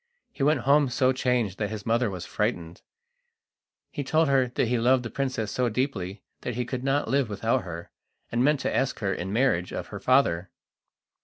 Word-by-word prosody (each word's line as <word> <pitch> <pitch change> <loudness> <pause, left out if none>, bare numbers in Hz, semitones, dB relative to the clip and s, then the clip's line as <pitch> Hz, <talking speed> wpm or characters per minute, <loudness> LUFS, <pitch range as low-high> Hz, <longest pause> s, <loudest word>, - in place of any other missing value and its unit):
He - - -8
went 145 -1 +3
home 140 +2 +4
so 130 +1 +2
changed 125 -7 0
that 105 -2 -1
his 110 -2 -6
mother 115 0 +2
was 90 -3 -6
frightened. 85 +1 -2 1.1
He 145 - -4
told 155 +2 +2
her 130 -3 +2
he 120 0 +1
loved 125 +2 +3
the 120 - -6
princess 130 -5 -2
so 125 -1 +1
deeply 105 -6 -3 0.2
that 125 - -4
he 125 0 -1
could 125 +1 -4
not 135 +2 +1
live 135 -4 +1
without 115 +5 0
her, 85 -1 -7 0.4
and 120 +1 +1
meant 145 0 +3
to - - -1
ask 135 - 0
her 100 -2 -1
in 95 +3 -4
marriage 105 -7 +1
of - - -5
her - - -6
father. 95 -9 +2
125 Hz, 190 wpm, -26 LUFS, 105-135 Hz, 1.1 s, home